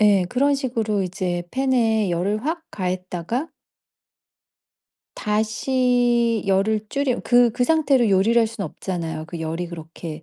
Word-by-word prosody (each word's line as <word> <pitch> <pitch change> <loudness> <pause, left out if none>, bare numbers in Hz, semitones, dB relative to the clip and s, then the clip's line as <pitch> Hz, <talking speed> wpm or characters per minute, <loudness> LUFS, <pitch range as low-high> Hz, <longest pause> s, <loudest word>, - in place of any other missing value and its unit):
예. 205 -3 +5
그런 280 +5 +2
식으로 225 -7 -1
이제 180 -1 -2
팬에 230 -6 +1
열을 200 +6 -1
확 320 +2 -2
가했다가 185 - -3 1.7
다시 235 +1 +1
열을 200 +3 +2
줄여 275 -3 0
그 245 -1 +5
그 245 +1 +1
상태로 275 -7 +3
요리를 200 +5 +4
할 230 - +4
수는 220 -3 -5
없잖아요. 165 -4 -5
그 170 -1 -7
열이 165 +2 -3
그렇게 165 -1 -8
215 Hz, 260 characters per minute, -22 LUFS, 180-245 Hz, 1.7 s, 예